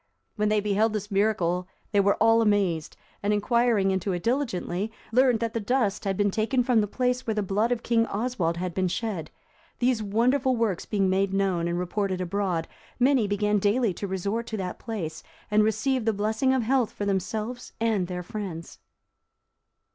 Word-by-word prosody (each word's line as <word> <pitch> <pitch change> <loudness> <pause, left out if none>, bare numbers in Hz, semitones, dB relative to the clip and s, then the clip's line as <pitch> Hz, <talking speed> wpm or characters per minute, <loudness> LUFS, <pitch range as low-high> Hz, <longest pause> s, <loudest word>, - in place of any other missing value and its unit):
When 210 -1 +1
they 215 0 +3
beheld 210 +2 +1
this 210 0 -4
miracle, 180 -3 +1 0.2
they 205 - +3
were 200 0 +4
all 225 +1 +4
amazed, 195 -7 +1 0.2
and 205 - 0
inquiring 215 -1 +2
into 190 0 -1
it 175 - -4
diligently, 225 -5 -1 0.2
learned 250 -1 +4
that 230 -1 -1
the 230 - -1
dust 215 -2 0
had 195 -1 -1
been 205 -1 +2
taken 230 +5 +1
from 240 -2 +3
the 210 - -1
place 250 +3 -1
where 220 - 0
the 210 - 0
blood 210 +5 0
of 240 -1 -1
King 230 -1 +2
Oswald 200 -7 -1
had 180 0 -3
been 185 +1 0
shed. 180 -5 -3 0.5
These 245 -2 +1
wonderful 250 +6 +2
works 225 -6 -1
being 200 -3 +1
made 190 +1 +1
known 185 -4 +1
and 170 0 -1
reported 185 +1 -1
abroad, 180 -2 -1 0.3
many 255 -3 +3
began 210 +1 +1
daily 210 +1 +2
to 200 - -5
resort 200 +5 -2
to 220 - -4
that 185 -2 -4
place, 185 -9 -5 0.3
and 210 0 +5
received 240 +3 0
the 225 - +3
blessing 220 +5 +1
of 260 -2 +2
health 250 0 +1
for 205 - -4
themselves 215 +5 -3
and 220 -5 +1
their 180 0 -4
friends. 175 -4 -6
210 Hz, 185 wpm, -26 LUFS, 190-230 Hz, 0.5 s, and